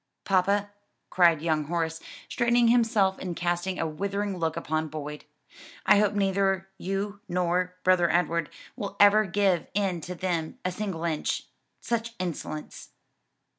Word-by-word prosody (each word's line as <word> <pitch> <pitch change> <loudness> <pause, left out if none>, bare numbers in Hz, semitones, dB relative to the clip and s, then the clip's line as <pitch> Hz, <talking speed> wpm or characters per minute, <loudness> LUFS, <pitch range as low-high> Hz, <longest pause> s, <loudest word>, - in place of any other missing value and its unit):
"Papa," 200 +2 +2 0.4
cried 170 -4 +4
young 155 -2 +1
Horace, 165 0 -2 0.3
straightening 240 -1 +3
himself 225 -5 +3
and 180 -2 -4
casting 175 +2 -1
a - - -1
withering 200 +5 -2
look 160 -1 -1
upon 155 0 -1
Boyd, 150 -1 -7 0.6
"I 210 - +6
hope 210 0 +2
neither 195 -1 +1
you 195 +2 -3
nor 180 +1 0
Brother 180 -2 +4
Edward 170 -1 +1 0.3
will 200 -1 -5
ever 205 +1 +6
give 190 -2 +1
in 190 -4 0
to 180 +2 -6
them 170 -3 -2
a 185 - +1
single 185 -3 -4
inch. 160 -3 -1 0.4
Such 230 0 -2
insolence!" 165 -4 -5
185 Hz, 135 wpm, -27 LUFS, 170-200 Hz, 0.6 s, I